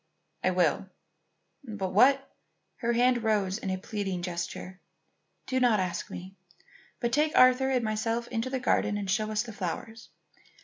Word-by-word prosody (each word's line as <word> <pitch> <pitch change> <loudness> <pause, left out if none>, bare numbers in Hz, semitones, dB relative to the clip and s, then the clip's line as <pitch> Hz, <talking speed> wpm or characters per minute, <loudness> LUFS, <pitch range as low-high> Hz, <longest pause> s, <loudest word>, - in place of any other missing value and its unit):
"I - - +3
will. 180 +1 +1 0.7
But 210 -6 -4
what 270 +6 +5 0.3
" - - -49
Her 235 -1 +1
hand 245 0 +3
rose 210 -2 0
in 195 - -4
a 185 - -1
pleading 190 -2 -4
gesture. 180 +1 -5 0.7
"Do 260 - 0
not 240 -4 +4
ask 180 -2 -3
me, 185 +2 -8 0.7
but 235 - -1
take 300 +2 +2
Arthur 255 +1 +6
and 255 -2 +1
myself 225 +2 -1
into 230 +1 -2
the 260 0 -2
garden 210 -4 +1
and 200 -1 -4
show 215 +1 0
us 215 0 0
the 230 - -9
flowers. 210 +4 -5
215 Hz, 165 wpm, -28 LUFS, 190-245 Hz, 0.7 s, Arthur